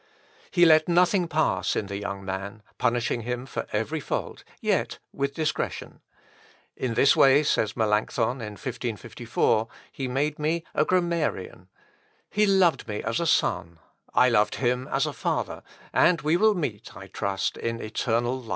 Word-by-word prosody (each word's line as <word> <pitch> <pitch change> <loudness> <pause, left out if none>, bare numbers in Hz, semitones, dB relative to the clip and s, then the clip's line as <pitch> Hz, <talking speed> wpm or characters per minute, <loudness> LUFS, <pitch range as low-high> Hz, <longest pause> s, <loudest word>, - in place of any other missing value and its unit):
He 175 -1 +4
let 155 0 +5
nothing 180 +1 +3
pass 155 0 0
in - - -1
the 100 0 -5
young 100 -1 -5
man, 100 +3 -5 0.2
punishing 120 0 0
him 125 +2 -4
for 135 - -5
every 110 +10 -1
fault, - - -4 0.2
yet - - 0 0.2
with 140 0 -2
discretion. 155 -2 -3 0.8
"In 125 -3 -3
this 135 - +5
way," 140 +2 +6
says 110 -7 0
Melancthon 110 +3 0
in 105 -2 -6
1554, 115 -2 -1 0.2
"he 135 - -4
made 145 +4 -1
me 160 +2 0
a 150 - +2
grammarian. 170 - -1 0.6
He 210 0 +3
loved 180 -10 +3
me 105 -2 -4
as 115 +1 -1
a 170 - 0
son, 85 - +1 0.3
I 125 - +5
loved 105 -4 +2
him 125 0 0
as - - 0
a - - -3
father, - - -2 0.3
and 170 -1 +4
we 155 +2 +2
will 215 +3 +4
meet, 120 - -4
I 95 - -9
trust, 100 0 -2
in 115 0 -3
eternal 120 +3 -1
life." 115 - -13
125 Hz, 160 wpm, -26 LUFS, 110-155 Hz, 0.8 s, way